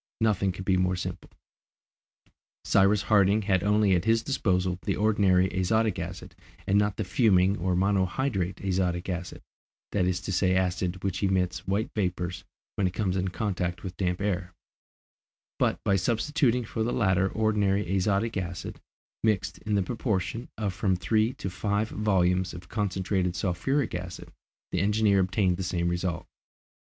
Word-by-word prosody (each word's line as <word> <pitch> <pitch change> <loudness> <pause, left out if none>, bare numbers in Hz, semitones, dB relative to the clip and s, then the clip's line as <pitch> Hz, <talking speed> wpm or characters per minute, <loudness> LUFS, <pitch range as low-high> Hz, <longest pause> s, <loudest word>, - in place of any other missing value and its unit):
Nothing 105 -4 +2
could 90 +1 -8
be 95 -1 +3
more 90 0 +1
simple. 90 0 -6 1.4
Cyrus 100 +1 +4
Harding 105 0 +3
had 95 -3 +1
only 105 -1 +3
at 90 -1 +1
his 115 0 +3
disposal 90 -9 0
the - - -1
ordinary 100 -3 +3
azotic 95 +2 +1
acid 90 0 -6 0.3
and 100 +1 +3
not 105 -2 0
the 110 - -1
fuming 95 -2 +3
or 90 +1 0
monohydrate 95 +1 0
azotic 90 -1 0
acid, 90 -1 -5 0.5
that 90 -3 +1
is 90 -1 0
to 95 - -5
say, 95 0 +2
acid 90 0 -1
which 95 -1 -2
emits 95 -2 0
white 100 +3 -1
vapours 90 -3 -2 0.3
when 95 - +2
it 90 - -5
comes 95 -4 0
in 95 0 0
contact 90 -3 -2
with 95 -2 -6
damp 90 0 -1
air; 90 -3 -2 1.0
but - - +1
by 100 - +2
substituting 120 - +1
for 110 - -4
the 115 +2 0
latter 95 -2 +2
ordinary 105 -3 +1
azotic 100 +4 +1
acid, 85 -2 -5 0.4
mixed, 100 -4 0
in 105 -1 -2
the 100 - +2
proportion 110 +1 -2
of 100 -3 -2
from 95 -1 +1
three 110 +6 +1
to - - -6
five 100 +3 -1
volumes 90 -4 +1
of 85 0 -10
concentrated 95 -3 -1
sulphuric 110 +10 -1
acid, 90 0 -6 0.4
the 90 - 0
engineer 105 0 +3
obtained 95 -1 +1
the - - -4
same 85 -1 -1
result. 85 0 -2
95 Hz, 155 wpm, -27 LUFS, 90-105 Hz, 1.4 s, Cyrus